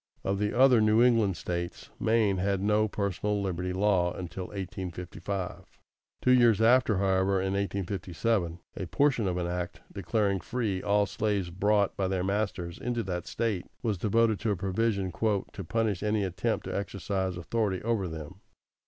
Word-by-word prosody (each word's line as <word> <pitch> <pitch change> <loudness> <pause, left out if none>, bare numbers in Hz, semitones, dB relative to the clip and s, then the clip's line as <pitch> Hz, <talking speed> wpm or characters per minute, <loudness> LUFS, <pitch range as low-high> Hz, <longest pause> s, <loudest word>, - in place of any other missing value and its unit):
= - - -37
Of 100 0 -1
the 105 +3 -1
other 130 -3 +6
New 110 +2 +5
England 115 -7 +3
States, 85 +2 -4
Maine 110 -3 +2
had 100 +1 0
no 105 +2 +2
personal 100 0 -1
liberty 90 -2 -2
law 95 -2 +2
until 90 +1 -6
1855. 95 0 -6 0.5
Two 125 - +4
years 120 -4 +5
after, 115 -2 +4
however, 95 0 +2
in 95 +1 -1
1857, 95 -1 -1 0.2
a 95 - -4
portion 135 - +2
of 90 -1 -1
an 90 - -1
act 90 0 -4
declaring 100 -3 0
free 100 0 -2
all 105 0 +2
slaves 100 -3 -1
brought 100 +2 +2
by 95 - 0
their 95 -1 -1
masters 95 -3 -2
into 120 -1 -2
that 90 -3 -4
State 110 -6 -2 0.2
was 105 -6 0
devoted 110 +2 +2
to 115 - -1
a 105 - +2
provision 95 +1 0
"to 100 +1 -2
punish 105 0 0
any 105 0 +1
attempt 95 -2 -1
to - - -4
exercise 95 -2 -2
authority 100 +1 -1
over 110 -4 0
them." 80 +4 -8
100 Hz, 160 wpm, -29 LUFS, 90-110 Hz, 0.5 s, other